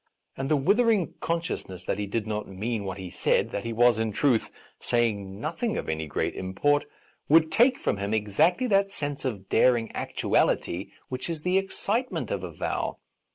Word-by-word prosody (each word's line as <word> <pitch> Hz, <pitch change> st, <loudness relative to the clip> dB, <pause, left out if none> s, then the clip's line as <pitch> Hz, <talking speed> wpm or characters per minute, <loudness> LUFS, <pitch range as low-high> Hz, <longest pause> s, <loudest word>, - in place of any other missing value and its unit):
And 135 Hz, +1 st, -3 dB
the 155 Hz, -, +4 dB
withering 205 Hz, -, +3 dB
consciousness 165 Hz, -, -3 dB
that 95 Hz, -, -1 dB
he 105 Hz, -, -2 dB
did 105 Hz, +2 st, -2 dB
not 105 Hz, -1 st, -3 dB
mean 105 Hz, +2 st, -3 dB
what 95 Hz, 0 st, -4 dB
he 95 Hz, -2 st, -7 dB
said, -, -, +1 dB
that 100 Hz, -, -3 dB
he 115 Hz, -, -2 dB
was, 120 Hz, 0 st, +4 dB
in 110 Hz, -1 st, 0 dB
truth, 120 Hz, +1 st, +2 dB, 0.3 s
saying 105 Hz, -5 st, 0 dB
noth 155 Hz, +6 st, -4 dB
ing 235 Hz, -3 st, 0 dB
of -, -, -4 dB
any 80 Hz, 0 st, -2 dB
great -, -, -1 dB
import, 145 Hz, +11 st, +1 dB, 0.4 s
would 160 Hz, +1 st, +5 dB
take 245 Hz, +8 st, +4 dB
from -, -, -1 dB
him 100 Hz, +1 st, -3 dB
exactly 110 Hz, -, +2 dB
that 200 Hz, -4 st, +3 dB
sense 145 Hz, -7 st, -4 dB
of 100 Hz, -7 st, -3 dB
daring 120 Hz, -1 st, +3 dB
actuality 90 Hz, +3 st, 0 dB, 0.2 s
which 130 Hz, +5 st, -4 dB
is 160 Hz, -3 st, -4 dB
the 180 Hz, +1 st, +3 dB
excitement 210 Hz, +5 st, -2 dB
of -, -, -2 dB
a -, -, -4 dB
vow. -, -, -3 dB
120 Hz, 185 wpm, -27 LUFS, 100-170 Hz, 0.4 s, would